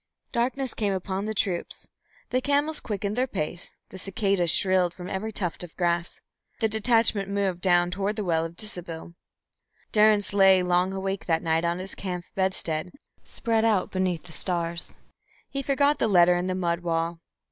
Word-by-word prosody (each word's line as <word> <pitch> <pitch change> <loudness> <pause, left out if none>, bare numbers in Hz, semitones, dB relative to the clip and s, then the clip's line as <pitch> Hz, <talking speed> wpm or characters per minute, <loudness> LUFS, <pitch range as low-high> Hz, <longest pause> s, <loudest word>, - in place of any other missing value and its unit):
Darkness 255 +2 -1
came 205 -3 0
upon 190 +1 -3
the 220 - -2
troops, 185 -4 -2 0.4
the 255 - +1
camels 290 +3 +1
quickened 205 -1 -3
their 255 +2 +1
pace, 175 -5 -4
the 190 - -9
cicadas 195 -2 +1
shrilled 180 0 +3
from 180 -1 -8
every 200 +4 -3
tuft 180 -5 -3
of 175 - -11
grass. 175 -1 -1 0.4
The 225 - +2
detachment 220 -2 +2
moved 195 -3 -1
down 175 -1 +3
toward 200 +3 -1
the 210 - -2
well 165 -3 +1
of 165 +1 -6
Disibil. 175 -5 -4 0.8
Durrance 210 -2 +4
lay 190 -2 +6
long 180 +1 +2
awake 195 0 -3
that 165 -2 +1
night 165 +1 +1
on 170 +1 0
his 185 +1 -5
camp 180 -3 -4
bedstead 180 -3 -1 0.3
spread 225 -1 -1
out 215 -5 +2
beneath 185 -3 -1
the 180 - -13
stars. 170 0 -1 0.6
He 275 - -2
forgot 280 +2 +2
the - - +2
letter 180 -3 +5
in 175 +1 -1
the 185 - -1
mud 170 -2 0
wall. 165 -1 -1
190 Hz, 170 wpm, -26 LUFS, 175-210 Hz, 0.8 s, lay